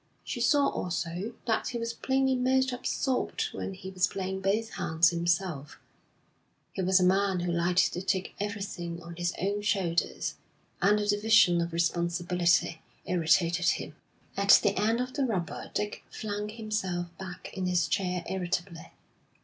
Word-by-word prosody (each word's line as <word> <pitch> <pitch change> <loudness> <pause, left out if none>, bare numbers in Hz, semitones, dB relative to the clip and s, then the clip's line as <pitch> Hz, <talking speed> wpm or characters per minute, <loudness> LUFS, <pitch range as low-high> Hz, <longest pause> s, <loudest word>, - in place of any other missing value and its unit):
She - - -4
saw, 285 -1 +4
also, 175 +5 -3
that 225 -2 0
he 240 - -3
was 230 0 -3
plainly 265 +2 +1
most 260 +1 +2
absorbed 265 - -1
when 195 - -5
he 190 0 -8
was 185 -1 +2
playing 190 0 -4
both 215 +4 0
hands 160 +1 +3
himself; 170 -4 -1 1.0
he - - -3
was 185 +1 +4
a - - +2
man 190 0 +2
who 175 0 -1
liked 175 +2 +2
to 180 - -3
take 190 0 -1
everything 195 -5 -4
on 170 0 -9
his 175 0 -1
own 200 +2 -1
shoulders, 190 -5 -1 0.4
and 205 +2 +4
the 210 - -1
division 205 -4 +4
of 170 0 -2
responsibility 170 0 +1 0.2
irritated 170 0 +2
him. - - 0 0.4
At 200 0 +7
the 200 - +2
end 220 +4 +1
of 255 +1 -4
the 280 - 0
rubber 185 -8 -3
Dick 210 0 -2
flung 210 -1 -4
himself 200 -6 -3
back 185 -2 -8
in 185 -2 -2
his 180 -1 +2
chair 180 -2 -1
irritably. 180 -2 -3
190 Hz, 155 wpm, -29 LUFS, 175-210 Hz, 1.0 s, At